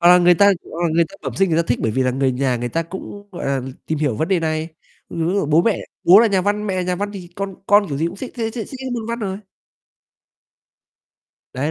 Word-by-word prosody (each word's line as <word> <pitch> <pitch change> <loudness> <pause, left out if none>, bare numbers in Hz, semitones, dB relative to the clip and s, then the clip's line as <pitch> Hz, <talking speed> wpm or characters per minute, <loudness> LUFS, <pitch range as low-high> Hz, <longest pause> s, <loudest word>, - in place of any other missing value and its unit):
Hoặc 175 - +6
là 180 0 +8
người 175 0 +6
ta, 200 +4 +5 0.2
ờ, 170 0 -2
người 170 +1 +4
ta - - -15
bẩm 135 -5 -4
sinh 195 +2 +2
người 165 +1 +3
ta - - -14
thích 120 - +1
bởi 115 - +1
vì 130 +5 +1
là 130 - +2
người 130 0 +1
nhà 130 -1 0
người 120 +1 -3
ta 165 +7 -1
cũng, 190 +4 -9
gọi 175 - -6
là, 135 -1 0 0.2
tìm 160 - -1
hiểu 145 -6 0
vấn 160 - -1
đề 190 -3 +2
này, 155 0 -1 0.4
ừm, 165 0 -2
ví 185 - 0
dụ 200 -7 +1
bố 155 +3 +4
mẹ, 225 -1 +1 0.3
bố 190 +4 +8
là 235 - +5
nhà 195 -3 +2
văn, 205 +2 -1
mẹ 190 -2 -1
là 185 - 0
nhà 180 0 -1
văn 205 +1 -3
thì 185 -4 -8
con 195 -1 -4
con 205 -1 +4
kiểu 140 - -3
gì 160 - +1
cũng 170 - -5
thích 260 - -7
thế 225 -3 -2
th - - -14
thích 230 -4 -4
cái 260 -1 -5
môn 230 -3 -3
Văn 235 0 -3
rồi. 195 -3 -3 2.1
Đấy, 140 +4 -2
175 Hz, 280 wpm, -20 LUFS, 155-200 Hz, 2.1 s, là